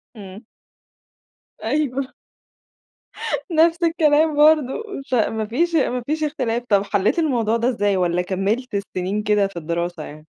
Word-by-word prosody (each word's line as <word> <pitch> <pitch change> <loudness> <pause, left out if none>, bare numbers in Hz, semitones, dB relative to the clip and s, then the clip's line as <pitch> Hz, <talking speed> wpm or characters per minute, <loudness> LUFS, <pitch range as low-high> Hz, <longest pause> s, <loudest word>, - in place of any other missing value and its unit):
امم. 200 0 -10 1.2
أيوه 270 +1 -1 1.4
نَفْس 330 +2 +3
الكلام 315 -2 +3
برضو 305 - +4 0.2
مش 270 - -9
ع 230 -4 +2
ما 220 -1 -3
فيش 330 +10 0
ما 250 -5 +1
فيش 310 +1 -2
اختلاف، 245 -6 -2
طَب 200 -1 +3
حلّيت 205 - 0
الموضوع 235 -8 +1
ده 235 +2 +1
إزاي؟ 205 -5 0
والَّا 180 -1 +1
كمّلت 200 +7 -2
السنين 200 +1 -3
كده 210 -1 +2
في 195 - -16
الدراسة 170 0 -3
يعني؟ 155 +1 -11
230 Hz, 140 wpm, -21 LUFS, 195-295 Hz, 1.4 s, برضو